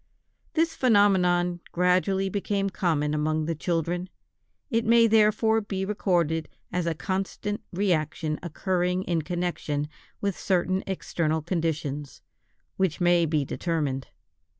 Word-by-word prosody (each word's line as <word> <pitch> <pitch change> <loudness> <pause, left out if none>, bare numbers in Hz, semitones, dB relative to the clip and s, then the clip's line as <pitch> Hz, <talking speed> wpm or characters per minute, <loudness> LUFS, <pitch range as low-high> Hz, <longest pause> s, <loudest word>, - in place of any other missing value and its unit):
This 325 0 +2
phenomenon 180 -6 +3
gradually 185 +2 +2
became 195 0 -1
common 155 -7 0
among 155 +1 0
the 165 - -1
children: 175 +2 -2 0.6
it 230 -1 +2
may 230 +1 +5
therefore 220 0 +4
be 195 -2 -3
recorded 175 -6 0 0.2
as 180 -1 -1
a 165 - 0
constant 195 +4 -3
reaction 160 -5 0
occurring 180 +2 -1
in 170 -3 0
connection 170 -3 -2 0.3
with 200 -2 -1
certain 185 0 0
external 160 -4 -1
conditions, 155 -5 -3 0.5
which 190 -5 0
may 175 -1 +4
be 150 -2 +1
determined. 145 -5 -2
180 Hz, 115 wpm, -26 LUFS, 160-195 Hz, 0.6 s, may